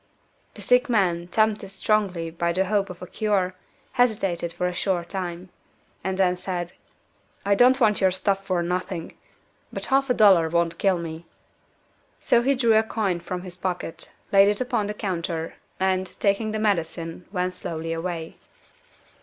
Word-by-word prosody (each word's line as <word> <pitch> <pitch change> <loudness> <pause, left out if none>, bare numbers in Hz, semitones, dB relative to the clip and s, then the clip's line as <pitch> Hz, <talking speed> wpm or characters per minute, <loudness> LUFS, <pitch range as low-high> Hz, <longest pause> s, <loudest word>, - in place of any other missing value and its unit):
The - - -10
sick 250 +2 +3
man, 175 -6 +1
tempted 215 0 +1
strongly 190 -4 0
by 170 +1 -1
the 190 +2 +1
hope 200 0 0
of 180 0 -9
a - - -5
cure, 195 -2 0 0.4
hesitated 195 -9 +1
for 180 - -3
a 180 - -1
short 175 -2 -1
time, 180 -1 -5 0.5
and 190 0 -2
then 185 -2 +3
said 180 -1 -4 0.7
"I 200 - +4
don't 250 +5 +5
want 215 -5 +3
your 190 - +5
stuff 195 +1 -1
for 185 -3 0
nothing. 180 -1 -3 0.6
But - - -3
half 275 0 +3
a 250 - +3
dollar 190 -7 +6
won't 170 0 0
kill 195 -2 +3
me." 165 0 -7 0.9
So 235 - +3
he 275 +3 +2
drew 235 -3 +3
a 220 - +6
coin 215 -5 -1
from 180 +1 -5
his 180 -1 -9
pocket, 180 -3 -5 0.2
laid 195 0 +7
it 205 0 +1
upon 245 -5 0
the 210 - -4
counter, 170 -5 -3 0.3
and, 190 0 +1
taking 205 +2 +1
the 215 - -2
medicine, 170 -4 -2
went 180 -2 -1
slowly 165 -2 -4
away. 165 -1 -4
185 Hz, 165 wpm, -24 LUFS, 175-210 Hz, 0.9 s, laid